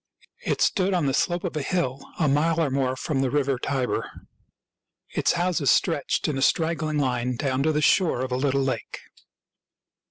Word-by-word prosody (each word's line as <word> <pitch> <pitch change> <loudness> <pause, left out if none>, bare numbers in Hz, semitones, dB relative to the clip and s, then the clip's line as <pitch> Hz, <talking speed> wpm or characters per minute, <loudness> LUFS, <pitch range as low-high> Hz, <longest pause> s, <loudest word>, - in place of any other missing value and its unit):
It - - -1
stood 190 -1 +2
on 170 -4 +1
the 135 - +1
slope 175 +4 0
of 180 -4 -4
a 150 - -1
hill, 135 -5 -1 0.2
a 155 - +1
mile 155 +4 +2
or 155 -5 +1
more 130 -1 0
from 135 +1 -2
the 135 - +1
river 140 -1 0
Tiber. 130 -1 -2 1.0
Its - - +1
houses 175 -6 0
stretched 160 -6 +1
in 145 -3 -1
a - - -3
straggling 160 0 +1
line 125 -3 0
down 130 +1 -1
to 155 +3 +2
the 150 0 0
shore 170 -6 +3
of 130 0 -3
a - - 0
little 135 +1 +1
lake. 130 - -4
140 Hz, 185 wpm, -25 LUFS, 130-165 Hz, 1.0 s, shore